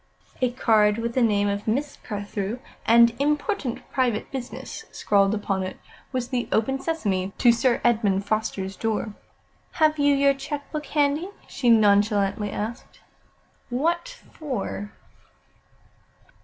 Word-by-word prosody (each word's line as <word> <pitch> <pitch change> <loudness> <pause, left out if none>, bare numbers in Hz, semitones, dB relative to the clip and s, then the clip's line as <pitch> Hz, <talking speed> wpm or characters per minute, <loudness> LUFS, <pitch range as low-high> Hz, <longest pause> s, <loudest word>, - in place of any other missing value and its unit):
A 255 - +3
card 215 -4 +3
with 230 0 -2
the 255 - +1
name 205 -3 +3
of 200 +1 -2
Miss 275 +6 -1
Carthew, 205 0 -4 0.3
and 235 +1 +6
"Important 295 - -1
private 245 -5 0
business" 260 -2 -6
scrawled 200 0 +2
upon 195 -2 -1
it, 185 0 -5 0.3
was 250 -2 -2
the 250 -2 -2
"Open, 270 +5 +1
sesame!" 200 - -1
to 240 - +6
Sir 235 +1 +2
Edmund 205 -5 +2
Foster's 205 -3 -2
door. 220 0 -2 0.6
"Have 310 -1 +2
you 285 0 +4
your 280 0 +4
cheque 285 +1 -6
book 305 -1 -4
handy?" 295 +4 +1 0.2
she 250 -4 0
nonchalantly 205 -2 +3
asked. 225 +5 -6 0.7
"What 335 - 0 0.2
for?" 230 -8 -4
235 Hz, 130 wpm, -24 LUFS, 205-275 Hz, 0.7 s, and